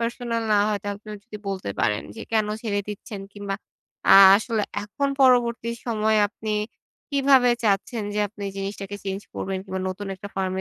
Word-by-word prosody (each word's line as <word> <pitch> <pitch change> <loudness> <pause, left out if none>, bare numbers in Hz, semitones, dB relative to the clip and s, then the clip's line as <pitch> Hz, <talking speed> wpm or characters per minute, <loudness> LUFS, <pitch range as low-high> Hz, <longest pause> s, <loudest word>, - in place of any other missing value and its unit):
personal 235 0 -2
না - - +5
হয়, 210 -1 0
তাহলে 205 +1 -5
এ 210 - -9
যদি 225 -3 -9
বলতে 190 - -3
পারেন 105 0 +1
যে, - - -7
কেন 215 -1 +3 0.2
ছেড়ে 205 -3 0
দিচ্ছেন 205 0 -7
কিংবা 200 -1 -4 0.6
আ - - +10 0.2
আসলে 220 0 -1 0.2
এখন 280 +7 -2
পরবর্তী 240 -2 +3 0.2
সময়ে 220 -2 +2
আপনি 215 +1 -5 0.6
কিভাবে 270 -3 +5
চাচ্ছেন 210 +2 +1
যে - - -1
আপনি 205 0 -11
এই 195 - -7
জিনিসটাকে 195 0 -5
চেঞ্জ 195 0 -3
করবেন, 190 0 -3
কিংবা 190 -1 -4
নতুন 195 +2 -5
একটা 200 +2 -9
ফার্ম 190 -1 -1
210 Hz, 175 wpm, -24 LUFS, 195-230 Hz, 0.6 s, আ